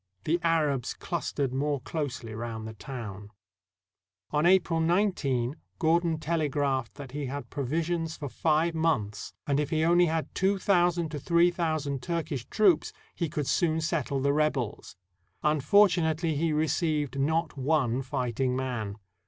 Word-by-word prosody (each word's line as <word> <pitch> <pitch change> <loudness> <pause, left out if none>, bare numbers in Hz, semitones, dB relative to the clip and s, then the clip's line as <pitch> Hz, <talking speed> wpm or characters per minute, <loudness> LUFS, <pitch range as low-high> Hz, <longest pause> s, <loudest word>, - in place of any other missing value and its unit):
The 170 +3 +1
Arabs 150 -7 +1
clus 170 -2 -3
tered 140 -3 -1
more 140 +2 0
closely 130 -5 -4
round 110 -1 -5
the 110 - -7
town. 105 -3 -7 1.0
On 150 +3 +3
April 180 -3 +4
19, 160 - +1 0.2
Gordon 165 0 +2
telegraphed 145 -5 -1
that 140 -3 -9
he 145 0 -4
had 140 +2 -6
provi 145 +4 -1
sions 165 -1 -2
for 145 - -5
five 160 +4 +1
months, 155 -11 -1
and 145 -2 +1
if 150 -1 -1
he 155 0 +1
only 175 +1 +5
had 160 0 -2
two 195 +1 +2
thousand 175 -4 +2
to 150 -1 -5
three 170 +4 +3
thousand 155 -6 -1
Turkish 160 -7 -3
troops 200 -7 +3 0.2
he 170 - -2
could 150 -1 -2
soon 160 +4 +1
settle 150 -5 -1
the 140 +1 +2
rebels. 145 -7 -1 0.5
Unfortunately, 160 +1 +3
he 160 +2 +1
received 150 -2 0
not 160 +3 0
one 135 -3 +1
fighting 125 0 -1
man. 120 -6 -3
150 Hz, 145 wpm, -28 LUFS, 135-165 Hz, 1.0 s, only